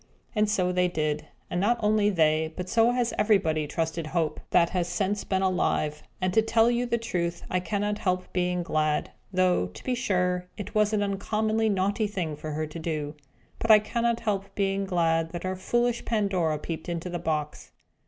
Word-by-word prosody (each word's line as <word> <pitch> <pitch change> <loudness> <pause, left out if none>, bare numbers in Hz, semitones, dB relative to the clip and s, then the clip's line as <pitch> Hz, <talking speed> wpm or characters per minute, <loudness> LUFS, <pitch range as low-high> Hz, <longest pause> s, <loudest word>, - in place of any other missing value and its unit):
And 210 0 +2
so 185 -4 +1
they 180 0 +2
did; 155 -3 -2 0.2
and 175 - -2
not 235 +4 +3
only 210 -1 +3
they, 160 -3 +2
but 180 0 -4
so 230 +4 +4
has 245 -1 0
everybody 165 -8 +2
trusted 160 +1 -2
Hope, 165 -1 -1
that 170 -1 +4
has 180 -2 0
since 200 +3 -1
been 190 -1 0
alive. 155 -5 0 0.2
And 185 -1 0
to 220 - +5
tell 225 +1 +3
you 245 +1 0
the 235 - +1
truth, 175 -6 -2
I 185 - +2
cannot 205 +2 -2
help 185 -1 -1
being 180 -1 0
glad 155 -2 0 0.2
(though, 185 - +2
to 90 - -12
be 255 - 0
sure, 180 -6 0
it 205 -1 -6
was 210 0 +3
an 210 -1 +1
uncommonly 215 +2 0
naughty 200 +2 +1
thing 180 -7 -3
for 150 +1 -6
her 155 +1 -1
to 155 +2 -8
do) 155 -3 -3 0.5
but 230 - -3
I 215 - +10
cannot 235 +2 0
help 200 -3 -2
being 195 0 0
glad 165 -3 +1
that 175 - -5
our 185 0 -1
foolish 240 +5 0
Pandora 190 -8 0
peeped 160 +3 -6
into 170 +1 -3
the 175 - -3
box. 150 -2 -3
185 Hz, 195 wpm, -27 LUFS, 165-210 Hz, 0.5 s, I